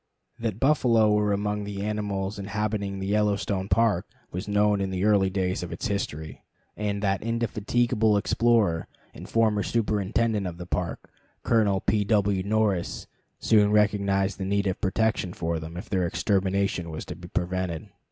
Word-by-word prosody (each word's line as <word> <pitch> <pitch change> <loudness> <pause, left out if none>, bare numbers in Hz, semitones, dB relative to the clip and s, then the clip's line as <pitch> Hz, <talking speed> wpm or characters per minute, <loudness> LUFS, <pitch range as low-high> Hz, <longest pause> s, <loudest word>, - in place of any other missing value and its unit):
That 115 -3 -3
buffalo 120 -6 +4
were 105 0 +2
among 105 +1 -1
the 100 -1 -5
animals 105 -1 -2
inhabiting 100 0 -2
the 95 - -4
Yellowstone 100 -1 0
Park 105 -2 +2 0.2
was 90 +3 -5
known 105 0 +2
in 95 - -1
the 95 +1 -1
early 100 -3 +4
days 95 -1 -1
of 90 - -6
its 85 - -3
history; 80 -6 -4 0.3
and 105 -1 -2
that 95 -1 +1
indefatigable 115 -1 +1
explorer 110 -5 +2 0.3
and - - -10
former 110 -2 +2
superintendent 105 -1 0
of 85 -1 -6
the 90 - -7
Park, 90 0 -4 0.3
Colonel 105 -4 +2
P. 105 +1 +1
W. 100 -2 +2
Norris, 100 -3 0 0.3
soon 105 -2 +4
recognized 100 -2 +2
the - - -2
need 100 +1 0
of 95 -1 -2
protection 105 -2 0
for 85 -2 -2
them 80 +2 -8
if 95 - -7
their 90 -3 0
extermination 95 -2 0
was 80 -1 -6
to - - -7
be - - -11
prevented. 90 -2 -3
100 Hz, 160 wpm, -26 LUFS, 95-105 Hz, 0.3 s, buffalo